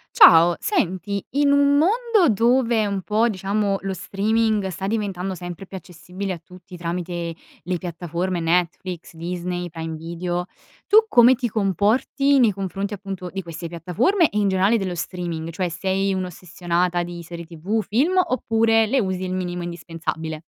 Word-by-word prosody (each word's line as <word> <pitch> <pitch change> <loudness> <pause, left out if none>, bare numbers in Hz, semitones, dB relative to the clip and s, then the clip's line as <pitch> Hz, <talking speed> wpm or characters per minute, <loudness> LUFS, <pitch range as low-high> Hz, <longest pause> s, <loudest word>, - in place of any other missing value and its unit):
Ciao. 170 - +8
Senti, 200 - -1
in 285 +1 +3
un 285 0 +4
mondo 435 - +3
dove 235 0 +2
un 200 -1 -2
po', 220 +5 +2
diciamo, 200 0 0
lo 195 0 -3
streaming 215 +2 0
sta 190 +1 -5
diventando 195 -3 -2
sempre 175 +1 -7
più 190 - -11
accessibile 185 +2 -6
a - - -6
tutti 180 +2 -14
tramite 170 0 -4 0.3
le 180 +1 -2
piattaforme 175 +1 -3
Netflix, 175 +1 -1
Disney, 175 +1 -4
Prime 160 -1 -5
Video, 175 +2 -4 0.4
tu 435 +2 +6
come 245 - +7
ti 245 -1 -2
comporti 220 - +2
nei 240 -5 +5
confronti 195 +1 -4
appunto 195 -2 -6
di 190 - -3
queste 170 -1 -7
piattaforme, 180 - +1
e 210 - -4
in 205 -1 +2
generale 190 +4 +3
dello 190 -4 -2
streaming? 170 -2 -4
Cioè 175 +1 -2
sei 190 +3 -1
un'ossessionata 180 -1 -1
di 175 0 -6
serie 170 0 -8
TV, 175 +7 -2
film, 300 - +2
oppure 225 -7 +2
le 265 +5 +1
usi 190 -4 -2
il 185 0 -3
minimo 180 -1 -3
indispensabile? 160 -2 -5
185 Hz, 155 wpm, -22 LUFS, 175-215 Hz, 0.4 s, Ciao